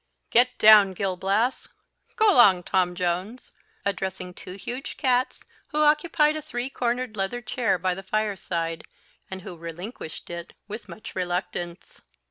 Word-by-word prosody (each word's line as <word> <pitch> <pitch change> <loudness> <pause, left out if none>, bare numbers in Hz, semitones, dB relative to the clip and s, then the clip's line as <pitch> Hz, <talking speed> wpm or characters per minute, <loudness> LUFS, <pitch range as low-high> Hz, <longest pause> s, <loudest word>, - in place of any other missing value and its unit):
Get 245 +1 +4
down, 210 -3 +8
Gil 190 0 -1
Blas 200 +7 0 0.5
go 435 -3 +5
along, 195 - +6
Tom 180 0 +1
Jones," 180 +7 -3 0.3
addressing 190 -2 -3
two 180 - -9
huge 240 +7 -6
cats, 255 -1 +1 0.2
who 305 0 +1
occupied 300 0 +3
a 310 - -3
three 265 -3 -4
cornered 245 -2 -2
leather 195 +4 -1
chair 235 -2 0
by 185 +1 0
the 195 - -7
fireside, 185 -5 -2 0.5
and 190 -1 -7
who 190 -4 -8
relinquished 170 +1 -8
it 170 0 -7
with 215 +2 -8
much 220 +1 -10
reluctance. 175 -1 -4
200 Hz, 140 wpm, -25 LUFS, 180-245 Hz, 0.5 s, down